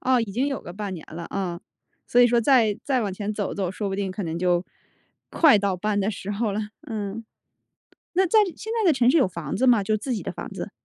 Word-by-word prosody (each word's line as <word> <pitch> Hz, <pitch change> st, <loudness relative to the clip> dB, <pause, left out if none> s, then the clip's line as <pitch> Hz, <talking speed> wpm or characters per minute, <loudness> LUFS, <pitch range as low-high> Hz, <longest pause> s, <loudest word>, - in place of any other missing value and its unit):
哦， 255 Hz, -1 st, +3 dB
已 220 Hz, -3 st, -3 dB
经 250 Hz, +7 st, 0 dB
有 275 Hz, -2 st, -2 dB
个 175 Hz, -, -9 dB
半 200 Hz, 0 st, -5 dB
年 160 Hz, -, -9 dB
了， 170 Hz, +1 st, -6 dB
啊， 180 Hz, -3 st, -3 dB, 0.5 s
所 245 Hz, -, +4 dB
以 245 Hz, -, +8 dB
说 240 Hz, 0 st, +3 dB
再 225 Hz, -4 st, +4 dB
再 265 Hz, -3 st, +1 dB
往 205 Hz, -4 st, -2 dB
前 205 Hz, +2 st, -3 dB
走 205 Hz, -2 st, -3 dB
走， 190 Hz, -3 st, -2 dB
说 200 Hz, +1 st, -3 dB
不 195 Hz, -, -3 dB
定 195 Hz, -2 st, -2 dB
可 195 Hz, +2 st, -5 dB
能 165 Hz, -1 st, -3 dB
就 180 Hz, 0 st, +1 dB, 0.7 s
快 290 Hz, -11 st, +6 dB
到 195 Hz, -2 st, 0 dB
搬 205 Hz, +2 st, -1 dB
的 200 Hz, +2 st, +1 dB
时 195 Hz, 0 st, -6 dB
候 210 Hz, 0 st, -1 dB
了。 210 Hz, -, -1 dB, 0.3 s
嗯。 215 Hz, 0 st, -4 dB, 0.9 s
那 375 Hz, +2 st, +3 dB
在 430 Hz, +5 st, +4 dB, 0.2 s
现 445 Hz, +1 st, -5 dB
在 375 Hz, -, +4 dB
的 -, -, +7 dB
城 255 Hz, -2 st, +3 dB
市 330 Hz, -, +4 dB
有 260 Hz, -, +4 dB
房 165 Hz, -5 st, -5 dB
子 260 Hz, -, +2 dB
吗？ 230 Hz, -5 st, +5 dB
就 215 Hz, +2 st, +1 dB
自 250 Hz, +5 st, -4 dB
己 220 Hz, -, -3 dB
的 -, -, -4 dB
房 -, -, -7 dB
子。 -, -, -6 dB
210 Hz, 270 characters per minute, -24 LUFS, 195-245 Hz, 0.9 s, 以